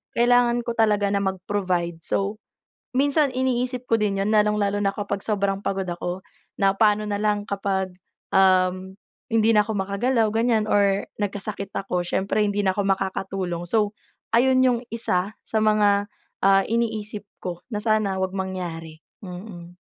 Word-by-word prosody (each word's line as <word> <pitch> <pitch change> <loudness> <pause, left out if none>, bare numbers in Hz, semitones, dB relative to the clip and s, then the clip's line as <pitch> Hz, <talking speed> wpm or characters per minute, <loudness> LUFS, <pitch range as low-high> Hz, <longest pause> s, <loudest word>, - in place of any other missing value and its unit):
kailangan 240 0 +3
ko 235 - -3
talaga 210 -2 +3
na 200 - +1
mag-provide. 185 -3 -2
So, 200 +5 -1 0.6
minsan 285 +1 +3
iniisip 255 -1 -1
ko 230 - -2
din 200 -2 0
yun 205 +2 0
lalong-lalo 210 -1 +2
na 195 - +2
kapag 200 -1 -3
sobrang 200 -2 0
pagod 195 -1 -2
ako 175 +2 -4 0.3
na 195 0 +4
paano 210 0 +3
nalang 205 0 0
kapag, 190 -2 -2 0.4
um, 185 0 +3 0.3
hindi 225 0 +3
na 210 - +6
ako 215 -1 -3
makagalaw 220 +5 +1
ganyan 225 -1 +2
or 200 -2 +2 0.2
nagkasakit 200 -1 -3
ako, 180 -2 -1
siyempre 190 +4 0
hindi 205 0 0
na 190 - +3
ako 205 - -1
makakatulong 190 -2 -2
so 210 0 +1 0.4
ayun 255 +2 +4
yung 245 -2 +3
isa 205 -3 -1
sa 220 - -2
mga, 205 -1 +3 0.3
ah, 195 0 +5
iniisip 220 -2 -2
ko 175 -1 -6
na 215 - -3
sana 215 -4 +1
wag 190 0 -2
mangyari, 175 -4 -5 0.2
mm. 180 -2 -9
205 Hz, 150 wpm, -24 LUFS, 190-220 Hz, 0.6 s, na